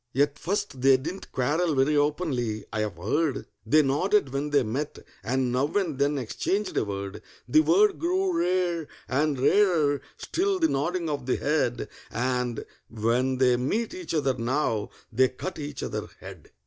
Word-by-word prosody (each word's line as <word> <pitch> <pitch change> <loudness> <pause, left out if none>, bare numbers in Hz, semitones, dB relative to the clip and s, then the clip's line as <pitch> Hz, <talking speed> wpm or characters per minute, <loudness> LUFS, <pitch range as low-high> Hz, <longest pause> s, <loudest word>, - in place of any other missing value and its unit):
At 145 +1 +2
first 195 -8 -2
they 135 0 +6
didn't 165 +9 -7
quarrel 150 +5 +1
very 135 +3 +3
openly, 145 -7 0
I've 105 -5 -2
heard; 140 - -1 0.2
They 155 0 +5
nodded 145 +2 +1
when 140 +2 -1
they 145 -2 +3
met, 135 +7 -3 0.3
and 130 0 0
now 130 +3 +1
and 170 -9 0
then 145 +1 +2
exchanged 185 - -2
a - - +2
word: 100 -1 -5 0.3
The 310 - +5
word 395 +5 +3
grew 365 +1 +1
rare, 175 - 0 0.2
and 140 +1 0
rarer 155 -4 +3 0.2
still 390 +2 0
the 325 -3 +2
nodding 170 +4 -1
of 140 -4 -3
the 130 - +2
head, 145 -5 0 0.2
And 125 0 -1 0.2
when 120 +4 0
they 125 -1 +4
meet 215 - -1
each 360 - -5
other 140 -4 +2
now, 120 -3 -1 0.2
they 130 +3 +4
cut 185 +8 -6
each 145 -2 -5
other - - -4
dead. - - -11
145 Hz, 160 wpm, -26 LUFS, 125-175 Hz, 0.3 s, they